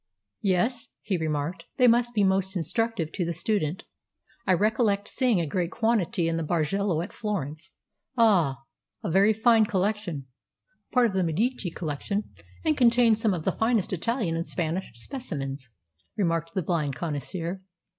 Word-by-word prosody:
"Yes," 210 +5 +1 0.2
he 205 -3 -1
remarked, 160 +1 -2
"they 250 - +5
must 240 0 +3
be 205 - +3
most 190 0 +2
instructive 190 -1 -1
to 185 - -2
the 170 0 -2
student. 175 -2 -1 0.6
I 190 - +5
recollect 205 +1 +2
seeing 245 -7 +2
a 170 - 0
great 170 +3 -1
quantity 215 -7 +1
in 165 0 0
the 165 - -1
Bargello 170 +2 0
at 190 - -9
Florence." 185 -4 -4 0.4
"Ah, 175 - +3 0.4
a - - -2
very 195 +5 +5
fine 220 0 +4
collection 195 -7 -1 0.7
part 250 -1 +4
of 220 - 0
the 190 -1 +1
Medici 200 +5 0
collection, 170 +6 -3 0.3
and 155 - +3
contains 235 -2 +4
some 215 -5 +2
of 165 - -5
the - - +3
finest 225 -4 +1
Italian 195 -1 -1
and 165 +1 -3
Spanish 175 +2 -2
specimens," 135 - -5 0.5
remarked 165 -4 0
the 185 - 0
blind 155 -5 -1
connoisseur. 170 +5 -4
190 Hz, 155 wpm, -27 LUFS, 165-220 Hz, 0.7 s, they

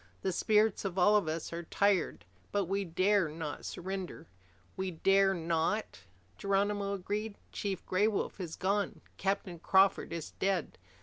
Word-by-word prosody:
The 190 - +1
spirits 215 +3 +2
of 195 -2 -3
all 205 +3 +5
of 205 -6 +3
us 160 +1 -3
are 170 - -3
tired, 200 +3 +1 0.3
but 200 -1 +1
we 195 +3 -1
dare 185 +1 +2
not 155 -1 -5
surrender." 185 -2 -5 0.5
"We 190 0 -2
dare 195 +3 +3
not," 165 +5 -1 0.4
Geronimo 200 0 +1
agreed. 205 +3 -3 0.2
"Chief 195 -3 -3
Gray 195 +3 +2
Wolf 210 -2 -2
is 170 -4 -5
gone. 200 +2 -1 0.2
Captain 195 -3 -1
Crawford 190 +2 +3
is 165 -2 -5
dead. 195 - -1
195 Hz, 145 wpm, -32 LUFS, 175-200 Hz, 0.5 s, all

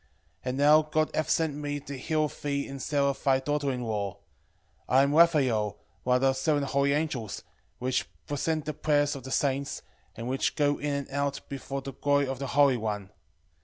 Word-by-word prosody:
12:14 - - -36 0.4
And 130 +1 -2
now 150 +2 +6
God 155 0 0
hath 155 - 0
sent 160 -3 +2
me 145 0 -3
to 140 0 -7
heal 155 +3 0
thee 140 -1 -3
and 135 0 -7
Sara 140 -1 +1
thy 135 -2 +4
daughter 145 0 -1
in 125 -1 -3
law. 105 -4 -2 0.8
12:15 - - +1
I 135 - +7
am 140 +1 +1
Raphael, 135 - +4 0.3
one 125 0 +3
of 125 - +2
the 135 0 +4
seven 145 +2 +1
holy 140 +1 +1
angels, 140 -8 -2 0.3
which 125 -7 -1 0.2
present 155 +1 -1
the 155 - -2
prayers 145 -1 +1
of 135 - -7
the 130 - -7
saints, 140 0 -1 0.3
and 115 +1 -6
which 130 +1 0
go 145 -1 +2
in 145 0 -2
and 140 -1 -4
out 140 0 -1
before 135 0 -5
the 135 0 -6
glory 145 +2 +2
of 130 -1 -4
the 140 - -3
Holy 140 -1 +4
One. 105 -4 -4
140 Hz, 200 wpm, -28 LUFS, 130-145 Hz, 0.8 s, I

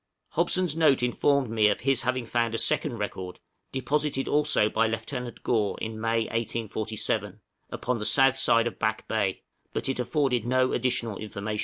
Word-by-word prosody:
Hobson's 180 -4 +1
note 150 -6 +4
informed 130 +1 +1
me 110 -2 +4
of - - 0
his 135 -1 +2
having 130 -1 -1
found 115 0 0
a - - 0
second 150 -1 +1
record, 95 -3 -5 0.3
deposited 135 +1 -1
also 145 -7 +3
by 115 +1 +1
Lieut. 120 +2 -5
Gore 110 -4 +1
in 110 0 -5
May, 115 0 +1
1847, 110 -1 -2 0.3
upon 125 -1 -2
the 105 - -3
south 135 +1 +4
side 115 0 +3
of 120 - -4
Back 110 0 -1
Bay, 100 -4 -1 0.3
but - - -2
it 135 - -2
afforded 125 -2 +1
no 130 +2 +2
additional 125 -4 -1
information. 105 0 -4
120 Hz, 165 wpm, -27 LUFS, 110-135 Hz, 0.3 s, note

